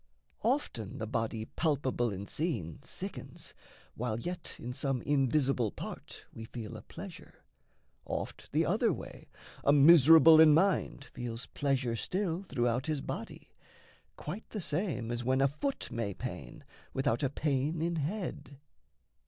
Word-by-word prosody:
Often 225 Hz, -, -1 dB
the 110 Hz, -, -3 dB
body 115 Hz, -1 st, -2 dB
palpable 135 Hz, -6 st, 0 dB
and 100 Hz, +1 st, -6 dB
seen 120 Hz, -, -3 dB
Sickens, -, -, -7 dB, 0.4 s
while 115 Hz, -1 st, -2 dB
yet 175 Hz, +6 st, -5 dB
in 125 Hz, +1 st, -6 dB
some 135 Hz, -2 st, -1 dB
invisible 135 Hz, -4 st, +2 dB
part -, -, -8 dB
We 115 Hz, -, -8 dB
feel 110 Hz, -2 st, -7 dB
a -, -, -8 dB
pleasure; -, -, -11 dB, 0.6 s
oft -, -, -5 dB
the -, -, +2 dB
other -, -, +2 dB
way, -, -, -8 dB, 0.3 s
A 140 Hz, -, +5 dB
miserable 160 Hz, +2 st, +8 dB
in 155 Hz, -2 st, +8 dB
mind 190 Hz, +4 st, +2 dB
feels 120 Hz, 0 st, -5 dB
pleasure 130 Hz, -4 st, 0 dB
still 180 Hz, -, -1 dB
Throughout 125 Hz, -7 st, -1 dB
his 155 Hz, -3 st, -1 dB
body -, -, -6 dB, 0.7 s
quite 190 Hz, +9 st, -6 dB
the 215 Hz, -, -4 dB
same 150 Hz, -, -2 dB
as 120 Hz, 0 st, -2 dB
when 130 Hz, +2 st, +2 dB
A 135 Hz, -, +5 dB
foot 210 Hz, -, -3 dB
may 110 Hz, -5 st, -2 dB
pain 90 Hz, -, -7 dB, 0.3 s
without 135 Hz, -3 st, +1 dB
a 140 Hz, -, +1 dB
pain 145 Hz, +2 st, 0 dB
in 170 Hz, +1 st, -1 dB
head. 160 Hz, -3 st, -4 dB
135 Hz, 140 wpm, -32 LUFS, 120-160 Hz, 0.7 s, miserable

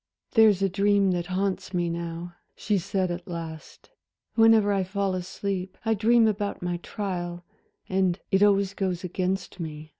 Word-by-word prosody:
"There's 215 Hz, -4 st, +5 dB
a -, -, +4 dB
dream 200 Hz, 0 st, +2 dB
that 175 Hz, -1 st, -2 dB
haunts 185 Hz, 0 st, -2 dB
me 175 Hz, -1 st, +1 dB
now," 170 Hz, +1 st, -5 dB, 0.2 s
she 205 Hz, -2 st, 0 dB
said 190 Hz, 0 st, -1 dB
at 175 Hz, 0 st, -6 dB
last, 165 Hz, -, -8 dB, 0.4 s
"whenever 225 Hz, -2 st, +5 dB
I 195 Hz, -1 st, +1 dB
fall 195 Hz, +1 st, -1 dB
asleep. 185 Hz, +1 st, -4 dB
I 225 Hz, -, +3 dB
dream 225 Hz, +2 st, +4 dB
about 205 Hz, -3 st, -2 dB
my 175 Hz, 0 st, -1 dB
trial, 175 Hz, -2 st, -5 dB, 0.4 s
and 185 Hz, -1 st, +1 dB
it 195 Hz, 0 st, +3 dB
always 200 Hz, -1 st, +4 dB
goes 185 Hz, -3 st, -2 dB
against 185 Hz, +1 st, -2 dB
me. 155 Hz, -2 st, -6 dB
190 Hz, 155 wpm, -26 LUFS, 175-200 Hz, 0.4 s, There's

